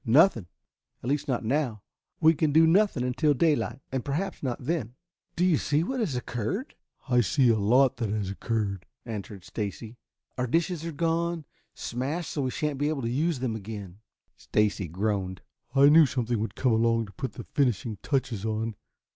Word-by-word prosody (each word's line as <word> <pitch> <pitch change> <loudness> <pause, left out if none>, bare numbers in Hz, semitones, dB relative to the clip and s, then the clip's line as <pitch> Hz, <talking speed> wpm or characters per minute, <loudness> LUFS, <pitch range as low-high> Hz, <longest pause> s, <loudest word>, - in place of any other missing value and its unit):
"Nothing. 125 - +4 0.6
At 120 - -3
least, 145 +1 0
not 125 -4 -1
now. 120 -5 0 0.4
We 160 0 +6
can 155 -1 +1
do 160 +2 +6
nothing 175 -5 +3
until 130 +4 +2
daylight, 135 -4 +1
and 130 -2 -2
perhaps 170 +7 -3
not 125 -2 -3
then. 135 -7 -2 0.4
Do 180 - +2
you 175 -5 +4
see 150 +3 +1
what 260 +8 -2
has 190 - -1
occurred?" 125 - -3 0.3
"I 125 -2 +4
see 130 +1 +3
a 115 - +5
lot 125 +5 +4
that 115 -4 -2
has 100 -2 -2
occurred," 100 -3 -2 0.2
answered 105 -4 -6
Stacy. 110 +3 -5 0.4
"Our 125 - 0
dishes 165 +4 0
are - - -3
gone, 165 +1 -1 0.3
smashed 140 +8 -3
so 145 - -2
we 130 - 0
shan't 150 0 -2
be 145 +1 +1
able 145 -4 -2
to 115 - -1
use 155 +4 +1
them 120 -4 -1
again." 100 -3 -7 0.4
Stacy 105 -3 0
groaned. 95 +1 -2 0.3
"I 140 +1 +7
knew 155 +1 +7
something 120 -3 -1
would 105 -1 -3
come 130 - +2
along 115 0 +2
to 100 - -13
put 130 +5 -5
the - - -7
finishing 120 -6 0
touches 130 -7 -1
on. 110 +1 -2
125 Hz, 180 wpm, -27 LUFS, 110-150 Hz, 0.6 s, I